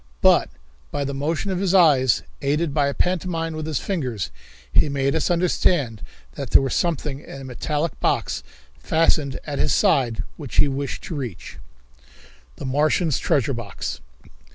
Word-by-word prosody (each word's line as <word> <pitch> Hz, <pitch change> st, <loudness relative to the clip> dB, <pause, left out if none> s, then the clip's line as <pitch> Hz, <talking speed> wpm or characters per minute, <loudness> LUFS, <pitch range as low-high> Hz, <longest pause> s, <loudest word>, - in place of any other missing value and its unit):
But -, -, +5 dB, 0.4 s
by 145 Hz, -, -2 dB
the 140 Hz, 0 st, -3 dB
motion 155 Hz, +7 st, -1 dB
of 185 Hz, -, -1 dB
his 195 Hz, -1 st, +1 dB
eyes, 140 Hz, -, +5 dB, 0.2 s
aided 145 Hz, +2 st, 0 dB
by 145 Hz, -2 st, +2 dB
a 140 Hz, -, -1 dB
pantomime 170 Hz, -2 st, -1 dB
with 155 Hz, 0 st, -4 dB
his 155 Hz, -4 st, -1 dB
fingers, 125 Hz, -, -2 dB, 0.4 s
he 150 Hz, -, +4 dB
made 140 Hz, -1 st, 0 dB
us 160 Hz, +2 st, +1 dB
understand 170 Hz, -, +1 dB, 0.3 s
that -, -, -5 dB
there -, -, +6 dB
was 135 Hz, -, -1 dB
something 150 Hz, -5 st, -1 dB
in 135 Hz, -2 st, -10 dB
a -, -, -8 dB
metallic 150 Hz, +4 st, -2 dB
box -, -, 0 dB, 0.4 s
fastened 155 Hz, -4 st, +1 dB
at 145 Hz, -2 st, -4 dB
his -, -, +2 dB
side 115 Hz, -5 st, +2 dB
which 145 Hz, -6 st, -7 dB
he -, -, +5 dB
wished 140 Hz, 0 st, -3 dB
to 165 Hz, -, -5 dB
reach. 125 Hz, -, -6 dB, 1.0 s
The -, -, -7 dB
Martian's 150 Hz, +3 st, +2 dB
Treasure 135 Hz, -1 st, +1 dB
Box. 110 Hz, -, -5 dB
145 Hz, 160 wpm, -23 LUFS, 135-165 Hz, 1.0 s, there